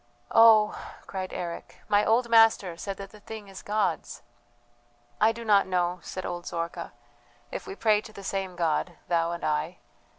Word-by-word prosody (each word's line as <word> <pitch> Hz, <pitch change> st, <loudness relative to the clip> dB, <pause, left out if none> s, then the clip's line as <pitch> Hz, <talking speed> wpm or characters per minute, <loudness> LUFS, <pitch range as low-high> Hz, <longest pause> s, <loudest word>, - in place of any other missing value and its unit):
"Oh!" 220 Hz, -2 st, +6 dB, 0.3 s
cried 185 Hz, -1 st, -5 dB
Eric, 170 Hz, -1 st, -6 dB
"my 205 Hz, 0 st, +3 dB
old 235 Hz, +3 st, +2 dB
master 225 Hz, -6 st, +4 dB
said 195 Hz, +3 st, -5 dB
that 195 Hz, -1 st, -9 dB
the 210 Hz, -, -14 dB
thing 215 Hz, 0 st, -9 dB
is 195 Hz, -, -10 dB
God's." 205 Hz, -5 st, -2 dB, 1.0 s
"I 220 Hz, -, +6 dB
do 230 Hz, 0 st, -8 dB
not 205 Hz, -3 st, +4 dB
know," 180 Hz, -1 st, 0 dB
said 185 Hz, -, -6 dB
old 175 Hz, 0 st, -5 dB
Zorka, 170 Hz, 0 st, -4 dB, 0.6 s
"if -, -, -6 dB
we 390 Hz, -, -6 dB
pray 215 Hz, -, +3 dB
to 220 Hz, -, -12 dB
the 200 Hz, -2 st, -11 dB
same 190 Hz, -1 st, -3 dB
God, 170 Hz, 0 st, 0 dB, 0.2 s
thou 170 Hz, -1 st, +1 dB
and 170 Hz, -, -6 dB
I. 155 Hz, +3 st, -1 dB
195 Hz, 170 wpm, -27 LUFS, 175-215 Hz, 1.0 s, Oh